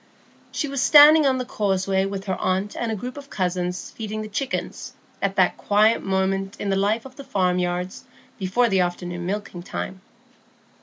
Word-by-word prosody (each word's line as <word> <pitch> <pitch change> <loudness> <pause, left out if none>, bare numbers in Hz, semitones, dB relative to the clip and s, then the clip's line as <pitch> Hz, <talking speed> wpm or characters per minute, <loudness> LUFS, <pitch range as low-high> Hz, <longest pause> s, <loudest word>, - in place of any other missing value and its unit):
She 300 - -2
was 275 -2 -2
standing 300 +1 +8
on 260 -1 +2
the 255 - -3
causeway 195 -4 0
with 195 0 -5
her 190 - -1
aunt 190 +2 -1
and 235 -1 -2
a - - -1
group 250 +6 -6
of 280 0 -10
cousins 180 -1 -2
feeding 215 -1 -5
the - - -6
chickens, 270 +6 -4 0.3
at 195 -1 0
that 185 -2 +3
quiet 215 +2 +3
moment 195 0 -1
in 200 - -2
the - - +2
life 210 +4 0
of 260 -1 -12
the 280 - -8
farmyards 180 -2 -1 0.3
before 195 +6 +2
the 195 -4 +2
afternoon 175 0 -3
milking 195 -3 -4
time. 185 +1 -6
195 Hz, 175 wpm, -23 LUFS, 185-230 Hz, 0.3 s, standing